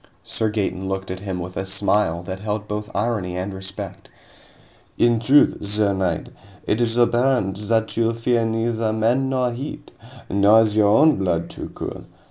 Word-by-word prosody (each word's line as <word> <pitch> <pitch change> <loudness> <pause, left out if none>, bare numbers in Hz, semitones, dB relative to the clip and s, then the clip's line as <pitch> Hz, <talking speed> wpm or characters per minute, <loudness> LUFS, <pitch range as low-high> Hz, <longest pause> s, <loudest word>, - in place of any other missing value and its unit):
Sir 110 - -1
Gaeton 95 -3 -2
looked 95 -1 -3
at 95 - -5
him 95 -2 -4
with 90 +1 -6
a - - -1
smile 95 -3 0
that 95 +1 -6
held 105 +1 -3
both 105 0 -4
irony 100 -4 -1
and 95 +2 -4
respect. 95 0 -7 0.9
"In 120 -1 +3
truth, 135 +6 +4
sir 105 0 +1
knight, 95 -4 -2 0.4
it 110 - 0
is 115 0 +1
apparent 120 -4 +2
that 110 0 +1
you 115 0 +2
fear 115 0 +1
neither 115 0 0
men 120 +5 +1
nor 130 -2 0
heat. 135 +5 -7 0.4
Nor 100 +3 +5
is 105 -1 -1
your 105 -1 +4
own 145 +9 +5
blood 90 -3 -1
too - - -7
cool. - - -6
105 Hz, 170 wpm, -22 LUFS, 95-115 Hz, 0.9 s, Nor